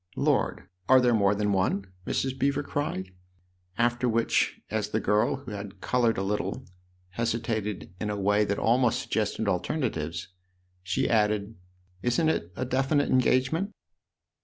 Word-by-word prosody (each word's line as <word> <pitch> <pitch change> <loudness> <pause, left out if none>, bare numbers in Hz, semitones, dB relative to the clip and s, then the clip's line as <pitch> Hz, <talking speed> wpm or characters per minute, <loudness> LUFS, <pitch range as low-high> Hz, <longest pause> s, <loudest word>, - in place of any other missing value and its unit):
" 90 - -30
Lord, - - 0 0.2
are 130 0 +8
there 125 -1 +3
more 100 -2 +3
than 105 0 0
one? 95 +1 +1
" 90 - -26
Mrs. 130 -1 -1
Beever 140 +2 +1
cried; 140 -11 -3 0.7
after 120 +1 +2
which, 115 0 +1
as 105 -1 -1
the 110 - 0
girl, 105 0 +2
who 135 -4 -9
had 100 -1 -7
coloured 120 0 +1
a 95 - -1
little, 105 +2 -2 0.4
hesitated 110 -3 -2
in 105 - -2
a 105 -1 -2
way 105 +2 +3
that 100 -1 -1
almost 120 0 +2
suggested 110 0 -1
alternatives, 90 - -2 0.5
she 130 +9 0
added: 105 -1 +1 0.3
" 90 0 -35
Isn't 125 - +2
it 85 - -1
a 130 - -2
definite 135 +3 +1
engage 130 0 +3
ment?" 195 +6 -2
110 Hz, 160 wpm, -27 LUFS, 100-125 Hz, 0.7 s, are